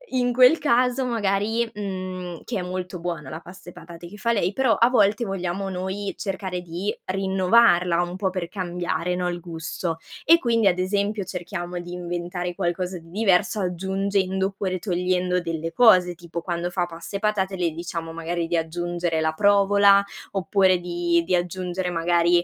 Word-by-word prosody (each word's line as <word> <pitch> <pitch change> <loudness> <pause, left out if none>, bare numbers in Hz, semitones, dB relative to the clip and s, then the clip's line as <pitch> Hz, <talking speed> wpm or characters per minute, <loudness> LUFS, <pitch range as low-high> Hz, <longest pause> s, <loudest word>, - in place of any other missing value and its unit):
In 245 -1 +2
quel 255 +6 +6
caso 250 -1 +2
magari 225 0 0
mhmm, 185 -4 -5
che 220 -5 -3
è - - -2
molto 180 0 -5
buona 170 -5 -4
la 160 - -5
pasta 180 0 -12
e - - -20
patate 170 +1 -11
che 205 +4 -11
fa 235 +2 0
lei 195 -2 0
però 260 -2 +3
a 235 +4 +4
volte 215 -1 +3
vogliamo 195 0 -3
noi 190 +2 -3
cercare 190 -2 -4
di 175 +4 -4
rinnovarla 185 -2 +3
un 175 +1 -5
po' 190 0 0
per 185 -2 -4
cambiare, 180 -2 -2
no, 180 0 -1
il 175 0 -4
gusto. 165 0 -4 0.3
E 335 +2 +7
quindi, 230 -7 +2
ad 180 -1 +3
esempio, 200 +2 0
cerchiamo 175 -1 -5
di 175 0 -8
inventare 175 0 -4
qualcosa 180 0 -2
di 165 0 -17
diverso 200 +1 +2
aggiungendo 190 +1 0
oppure 195 -2 -3
togliendo 180 -1 0
delle 165 -1 -3
cose, 185 -5 +5
tipo 170 0 -7
quando 175 0 -2
fa 180 -1 -1
pasta 170 +3 -9
e - - -1
patate 200 -2 0
le 175 -3 0
diciamo 165 0 -5
magari 165 +1 -2
di 170 0 0
aggiungere 175 0 -2
la 160 0 +1
provola, 200 +1 +5 0.3
oppure 190 0 +3
di 175 -1 0
di 185 - -1
aggiungere 180 +1 -1
magari 175 0 +2
180 Hz, 170 wpm, -24 LUFS, 175-200 Hz, 0.3 s, E